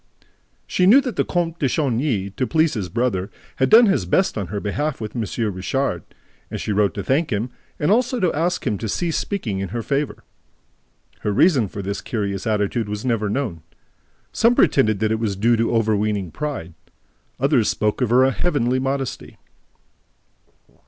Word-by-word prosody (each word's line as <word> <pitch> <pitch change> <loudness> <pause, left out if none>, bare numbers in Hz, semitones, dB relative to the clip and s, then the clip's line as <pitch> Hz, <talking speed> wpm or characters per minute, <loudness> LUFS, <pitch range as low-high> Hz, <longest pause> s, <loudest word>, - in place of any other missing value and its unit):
She 180 - +1
knew 235 +8 +8
that 250 -6 -4
the - - +2
Comte 170 -2 -2
de 140 - +2
Chagny, 120 -8 0
to 130 - -1
please 160 -1 +2
his 100 -7 -3
brother, 110 -5 -1 0.3
had 130 0 +2
done 235 +2 +8
his 190 - +1
best 185 - +2
on 100 -4 -3
her 100 +4 -4
behalf 145 +9 -2
with 110 0 -6
M. 115 - -1 0.3
Richard; 135 +9 -1 0.5
and - - -5
she - - -3
wrote 100 -1 +1
to 100 - -3
thank 140 - +1
him 110 +4 -2 0.3
and 150 - +1
also 245 +2 +2
to 180 -3 +1
ask 170 +4 -1
him 105 -6 -1
to 110 - -4
cease 170 - -1
speaking 120 - -3
in 95 -1 -3
her 115 +2 -4
favor. 140 +3 -2 1.0
Her 105 - -1
reason 130 - +3
for 100 +1 -7
this 100 +1 -3
curious 100 -4 -3
attitude 105 +1 0
was 105 +3 -4
never 115 -4 0
known. 105 - -2 0.7
Some 235 +2 +3
pretended 110 - +3
that 110 0 +1
it 110 - 0
was 105 -4 -1
due 115 +5 +3
to 115 +1 0
overweening 105 -4 0
pride; 140 - -5 0.7
others 135 -5 +2
spoke 105 +4 -1
of 125 - +1
her 130 +3 +4
heavenly 130 -6 0
modesty. 135 0 -3
120 Hz, 180 wpm, -21 LUFS, 105-150 Hz, 1.0 s, knew